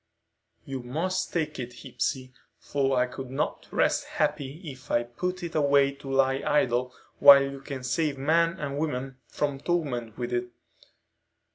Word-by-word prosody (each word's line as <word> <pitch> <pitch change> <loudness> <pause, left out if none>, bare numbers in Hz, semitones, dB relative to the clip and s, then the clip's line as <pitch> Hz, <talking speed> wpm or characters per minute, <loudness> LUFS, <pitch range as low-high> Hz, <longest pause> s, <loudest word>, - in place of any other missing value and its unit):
"You 135 -1 -5
must 165 +10 -2
take 155 -4 -2
it, 125 -1 -7
Hepsey, 130 -1 -3 0.2
for 135 -2 0
I 125 - +4
could 125 +1 -8
not 135 - -2
rest - - +1
happy 150 -1 -2
if 130 -4 -9
I 120 - +2
put 180 +10 -4
it 170 -1 -5
away 140 -2 +4
to 140 0 -11
lie 135 0 +2
idle 125 -3 +1 0.3
while 140 -1 +10
you 135 0 -5
can 135 -2 -6
save 150 +2 0
men 165 +5 +2
and 140 -1 -3
women 135 -4 -3
from 145 -2 -2
torment 135 -10 -2
with 125 0 -3
it. 120 0 -1
135 Hz, 155 wpm, -27 LUFS, 130-150 Hz, 0.3 s, while